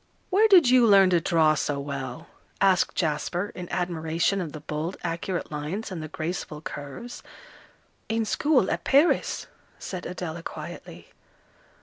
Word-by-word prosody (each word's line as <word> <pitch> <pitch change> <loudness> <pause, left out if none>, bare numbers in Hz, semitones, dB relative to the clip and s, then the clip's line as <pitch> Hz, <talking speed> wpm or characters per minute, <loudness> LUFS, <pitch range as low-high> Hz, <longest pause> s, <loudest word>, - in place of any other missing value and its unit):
"Where 420 +4 +5
did 365 - +7
you 245 -1 +6
learn 195 -3 +6
to 175 -2 +3
draw 160 -2 +3
so 145 -1 -1
well?" 135 -3 -5 0.3
asked 190 -2 +3
Jasper, 175 +4 -1
in 180 -1 -7
admiration 170 +2 0
of 165 -4 -5
the 155 - -8
bold, 155 +4 -4
accurate 170 +1 -3
lines, 155 +9 -4
and 175 -4 -5
the 155 - -5
graceful 155 0 -5
curves. 150 - -8 0.9
"In 225 0 0
school, 260 -2 +2
at - - -2
Paris," 285 +5 +2 0.3
said 185 -2 -6
Adela, 170 -2 -5
quietly. - - -9
175 Hz, 140 wpm, -26 LUFS, 155-200 Hz, 0.9 s, did